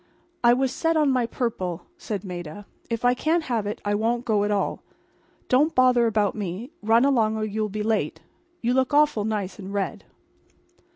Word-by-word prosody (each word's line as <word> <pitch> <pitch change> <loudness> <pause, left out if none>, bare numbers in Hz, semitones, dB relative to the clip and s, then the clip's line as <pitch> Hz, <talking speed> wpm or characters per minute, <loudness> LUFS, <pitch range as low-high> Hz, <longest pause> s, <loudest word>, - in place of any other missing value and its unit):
"I 240 0 +7
was 260 +1 +1
set 325 +3 0
on 300 -3 +3
my 250 -3 +1
purple," 190 -9 -3
said 210 - -5
Maida. 180 +1 -7 0.2
"If 230 +1 -2
I 245 - +5
can't 320 +6 0
have 230 -7 -1
it 210 - -4
I 205 - +1
won't 235 +3 0
go 210 -3 +2
at 205 - 0
all. 205 -1 -1 0.7
Don't 290 +6 +3
bother 250 -2 +4
about 210 -2 +1
me. 210 - -5
Run 225 +4 +4
along 225 -6 +2
or 215 - -1
you'll 215 0 -2
be 210 +1 -3
late. 210 -8 -1 0.4
You 240 +2 +2
look 260 +2 +1
awful 290 -8 +3
nice 210 -2 -3
in 195 0 -7
red." 200 -1 -3
220 Hz, 185 wpm, -24 LUFS, 205-250 Hz, 0.7 s, I